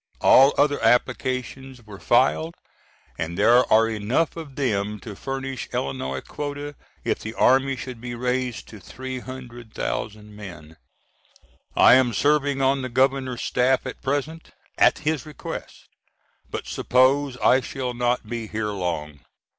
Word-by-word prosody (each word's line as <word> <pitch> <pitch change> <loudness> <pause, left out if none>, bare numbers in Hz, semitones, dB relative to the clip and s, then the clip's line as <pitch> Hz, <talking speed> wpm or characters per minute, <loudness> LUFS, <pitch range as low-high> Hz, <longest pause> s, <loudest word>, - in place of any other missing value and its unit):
All 135 +2 +6
other 145 -3 +2
applications 130 +2 0
were 100 -2 -11
filed, 80 0 +2 0.6
and 85 +2 -3
there 120 +4 +4
are 110 +1 +6
enough 115 +9 0
of 155 -5 -9
them 105 -6 -1
to 105 -3 -8
furnish 135 +2 -5
Illinois 65 0 -3
quota 145 0 -6 0.3
if - - -1
the 110 +1 -7
Army 135 +1 +3
should 125 -1 -8
be 120 -1 -5
raised 125 0 -2
to 110 - -11
300,000 120 - -6
men. 85 -7 -10 1.0
I - - +7
am 125 -2 +4
serving 145 -1 +2
on 135 +1 +2
the 130 - -4
Governor's 130 0 +1
staff 125 +2 +1
at 130 - -7
present 145 +4 -3 0.3
at - - +4
his 155 0 -2
request, 150 - -8 0.6
but - - -5
suppose 130 +1 +2
I 130 +1 +4
shall 130 -1 -4
not 120 -1 -1
be 115 -1 -4
here 105 0 -3
long. 85 -7 -4
125 Hz, 135 wpm, -24 LUFS, 105-135 Hz, 1.0 s, I